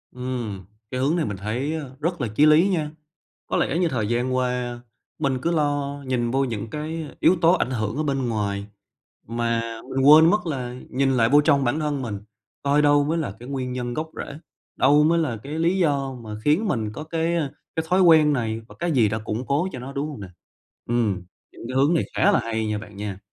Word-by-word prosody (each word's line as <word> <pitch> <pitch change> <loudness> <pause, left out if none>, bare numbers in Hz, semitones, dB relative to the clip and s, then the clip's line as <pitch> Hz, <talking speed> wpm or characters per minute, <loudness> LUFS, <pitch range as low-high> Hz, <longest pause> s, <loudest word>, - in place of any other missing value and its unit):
Ừm, 120 -7 -4 0.3
cái 130 - -2
hướng 140 +5 +2
này 165 -3 0
mình 100 - -4
thấy, 120 +10 -2
a, 160 - -3 0.2
rất 170 +1 -2
là 125 - 0
chí 150 - +5
lý 155 +4 +6
nha. 155 -5 -1 0.6
Có - - -1
lẽ - - +1
như 175 -1 +2
thời 110 -8 -1
gian 120 +2 0
qua 125 -1 -1 0.4
mình 135 -4 0
cứ 170 - +1
lo 145 -3 -1
nhìn 120 -2 0
vô 135 +2 +1
những 115 -3 -4
cái 155 +2 -4
yếu 185 - +5
tố 165 +1 +6
ảnh 130 - +1
hưởng 110 -2 -2
ở 155 - 0
bên 135 -4 -1
ngoài, 100 -3 -2 0.6
mà 115 0 -1 0.3
mình 135 - -1
quên 155 +3 +8
mất 210 -1 +1
là 125 -6 -3 0.2
nhìn 135 +1 +1
lại 115 -3 +3
vô 145 +4 +6
trong 145 -2 +3
bản 130 +6 0
thân 145 -3 -1
mình, 105 -5 -4 0.4
coi 145 +1 +3
đâu 145 -1 +4
mới 160 +3 0
là 150 -11 -2
cái 120 - -10
nguyên 130 -2 -3
nhân 120 -1 -3
gốc 160 +3 -4
rễ, - - -9 0.4
đâu 145 +3 +5
mới 165 +2 +3
là 150 -8 -1
cái 140 - -8
lý 170 +4 +2
do 140 -6 +1
mà 110 - -9
khiến 170 +9 +2
mình 110 - -1
có 150 - -7
cái, 165 +1 -1
ơ, 145 -5 -1 0.2
cái 160 - 0
thói 185 +2 +3
quen 160 -4 +6
này, 115 -4 -1
và - - -13
cái 170 -1 -1
gì 120 -7 +4
đã 110 +2 -2
củng 110 +3 -4
cố 150 +7 +1
cho - - -6
nó, 130 +2 -7
đúng 140 +2 -2
hông 145 -7 -8
nè? 95 - -7 0.6
Ừm, 115 -6 0 0.3
những - - -13
cái 130 - -4
hướng 140 +5 +4
này 165 - +2
khá 205 - +4
là - - +4
hay 110 -1 -2
nha 105 -1 -1
bạn 105 -1 -11
nha. 100 -2 -5
135 Hz, 235 wpm, -23 LUFS, 120-155 Hz, 0.6 s, quên